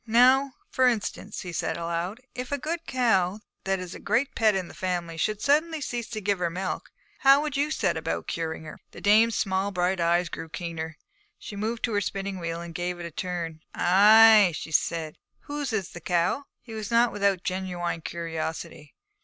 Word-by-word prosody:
'Now, 255 +4 +5 0.2
for 260 -1 +4
instance,' 215 -3 -2
he 175 -2 -7
said - - -2
aloud, 170 +6 -3
'if 250 +2 -6
a 285 - +1
good 325 +4 -4
cow, 205 -6 +2 0.3
that 195 0 +1
is 185 -1 -7
a - - -9
great 235 +6 0
pet 215 -3 +3
in 185 -2 -2
the - - -12
family, 175 -3 -3
should 210 +6 -1
suddenly 310 +3 +2
cease 240 -4 -4
to 215 - -4
give 200 -2 0
her 175 -1 0
milk, 185 +2 -4 0.3
how 275 0 +7
would 300 -2 -3
you 285 +2 +1
set 195 - 0
about 160 - -3
curing 160 -1 -3
her?' 155 - -10
The - - -10
dame's 220 +2 +4
small 190 +1 0
bright 180 -1 0
eyes 170 +1 +2
grew 165 - -7
keener. 165 -2 -5 0.4
She 205 - -9
moved 225 +3 -3
to 230 - 0
her 205 - +2
spinning 195 0 -3
wheel 165 0 -4
and 170 -1 -8
gave 175 +1 -3
it 175 - -5
a 170 - -6
turn. 170 -2 -4 0.2
'Ay,' 210 +1 +7
she 160 - -6
said, 160 0 0
'and - - -40
whose 290 -2 -3
is 200 -5 -2
the 175 - -9
cow?' 175 - 0 0.2
He 230 - -10
was 215 -1 -5
not 235 0 +4
without 200 -1 +2
a - - -25
genuine 180 -3 -3
curiosity. 160 -2 -5
190 Hz, 205 wpm, -26 LUFS, 170-230 Hz, 0.4 s, how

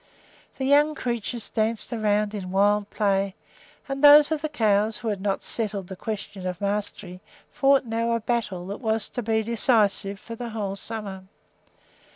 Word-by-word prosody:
The 265 - -2
young 295 +2 +4
creatures 235 -3 -3
danced 220 +1 -1
around 210 -2 0
in 190 -3 -5
wild 205 +2 +2
play, 195 -2 0 0.5
and 275 +1 -4
those 295 +1 +8
of 310 -2 -1
the 310 - -2
cows 215 -5 +1
who 230 - -4
had 200 -3 -3
not 195 -1 -1
settled 205 -5 -2
the 190 - -6
question 200 -2 -5
of 180 -1 -4
mastery 200 -2 -4 0.3
fought 275 -1 +3
now 230 0 -1
a 230 - +1
battle 210 -6 -2
that 200 +6 -6
was 220 -2 0
to 245 - -4
be 220 -1 0
decisive 210 -3 +2
for 230 - -9
the 235 0 -6
whole 205 -3 -3
summer. 200 -3 -5
215 Hz, 170 wpm, -25 LUFS, 200-235 Hz, 0.5 s, those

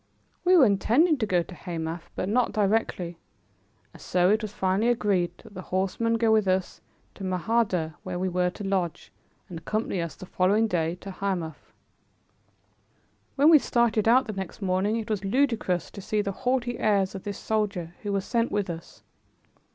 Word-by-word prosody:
We 365 0 +5
were 285 - +7
intending 250 - +3
to 220 - 0
go 180 -3 +2
to 180 - -12
Hamath, 165 -2 -5
but - - -2
not 240 +4 +1
directly, 195 -5 0 0.7
and - - -14
so 180 +1 +2
it 215 +1 +2
was 215 -2 -5
finally 195 +3 +1
agreed 195 -7 +1
that - - -15
the 185 - -7
horseman 195 +5 0
go 225 -1 +2
with 215 -2 +3
us 185 0 -1 0.3
to 195 - -10
Mahardeh 185 -3 0
where 185 -1 -5
we 185 +1 -1
were 180 0 +1
to 195 +3 -9
lodge, 190 -4 -2 0.4
and 170 -3 -7
accompany 205 +1 -2
us 170 -1 -5
the 185 - -10
following 195 +5 +2
day 170 -5 0
to 195 - -7
Hamath. 180 -5 -4 1.6
When 290 +4 +6
we 310 - +8
started 230 -4 +1
out 250 +3 +5
the 215 - -5
next 190 -2 -6
morning, 195 +2 0
it 225 - -4
was 205 -2 -1
ludicrous 220 -5 0
to 200 - -9
see 210 +2 -1
the 200 - -2
haughty 245 +3 -1
airs 195 -3 +2
of 195 - -6
this 205 0 -5
soldier 200 -6 -2
who 205 - -3
was 195 -1 -1
sent 230 0 0
with 205 -3 -1
us. 165 0 -10
195 Hz, 180 wpm, -26 LUFS, 180-225 Hz, 1.6 s, we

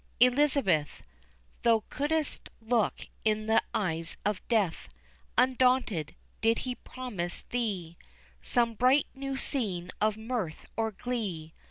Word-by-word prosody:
Elizabeth, 250 - +3 0.6
Thou 225 -2 +4
couldst 300 +1 -1
look 225 -1 0 0.2
in 215 0 +1
the 220 0 +4
eyes 165 -4 -2
of 205 -2 0
Death, 205 - +1 0.5
Undaunted, 250 - +3 0.3
did 225 0 +4
he 255 - -1
promise 230 -10 -5
thee 195 -9 -2 0.4
Some 235 -2 +2
bright 255 +5 +4
new 275 0 -4
scene 190 - -1
of 215 0 +2
mirth 220 -8 -3
or 225 +1 +1
glee. 200 -8 -4
225 Hz, 115 wpm, -30 LUFS, 185-250 Hz, 0.6 s, Thou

